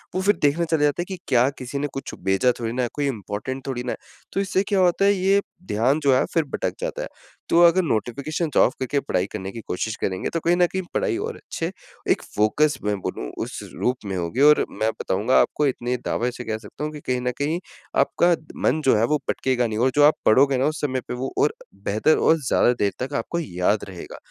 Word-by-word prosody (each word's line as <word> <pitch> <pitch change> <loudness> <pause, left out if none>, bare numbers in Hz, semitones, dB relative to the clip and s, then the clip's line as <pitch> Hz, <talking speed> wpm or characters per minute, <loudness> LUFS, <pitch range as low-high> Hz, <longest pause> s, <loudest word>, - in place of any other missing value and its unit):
वो 185 - +1
फिर 205 +2 +3
देखने 150 +4 +3
चला 160 -2 +2
जाता 145 +4 +2
है 175 - -3
कि 190 - -4
क्या 125 0 +4
किसी 130 +2 -5
ने 145 - -1
कुछ 135 - -6
भेजा 95 +6 +3
थोड़ी 115 -1 -2
ना 125 0 0
है, 120 - -1
कोई 145 -1 -1
इम्पोर्टेंट 120 +3 -4
थोड़ी 125 -2 -3
ना 125 - -3
है। - - -4 0.4
तो - - 0
इससे 190 0 +1
क्या 200 -2 +2
होता 185 +2 +3
है 200 - +5
ये 195 +1 +3 0.3
ध्यान 125 +8 +2
जो 140 - +5
है 130 - +3
फिर 165 -2 +3
भटक - - -2
जाता - - -3
है। - - -4 0.4
तो 170 - +5
अगर 175 +2 +6
नोटिफ़िकेशंस 140 +5 -2
ऑफ 130 - +5
करके 135 +2 0
पढ़ाई 95 -9 -1
करने 95 -2 -5
की 115 - -8
कोशिश 110 +4 -2
करेंगे 95 -1 -1
तो 165 - 0
कहीं 170 +2 +2
न 180 - +5
कहीं 190 +1 -3
पढ़ाई 445 -8 0
और 450 +4 -4
अच्छे 165 +2 -5 0.4
एक - - +2
फोकस 145 +8 +2
मैं 105 0 0
बोलूँ - - -4 0.2
उस - - -7 0.2
रूप 125 +1 +1
में 95 - -3
होगी। 90 +10 -2
और 150 +1 +6
मैं 110 - -1
बताऊँगा 105 +7 +1
आपको 150 - +1
इतने 125 -1 -1
दावे 120 +1 0
से 125 - -8
कह 110 -1 -2
सकता 110 +7 -9
हूँ 150 - -2
कि 150 - -7
कहीं 125 -1 +1
न 125 0 0
कहीं 155 +5 -1 0.4
आपका 175 0 +3 0.3
मन 155 +5 +3
जो 130 - +5
है 110 - +2
वो 150 +4 +2
भटकेगा 125 -2 +1
नहीं। 110 0 -3
और 130 +2 +3
जो 145 - +5
आप 150 - +7
पढ़ोगे 135 +4 +5
ना 130 - +1
उस 155 +1 -1
समय 130 -3 -1
पे - - -4
वो 130 +2 -4
और 150 - +3 0.3
बेहतर 110 +10 +3
और 165 - +4
ज़्यादा 120 - +4
देर 100 -1 +2
तक 135 - -5
आपको 170 - -2
याद 100 - 0
रहेगा। 90 -3 -9
135 Hz, 240 wpm, -23 LUFS, 115-160 Hz, 0.4 s, आप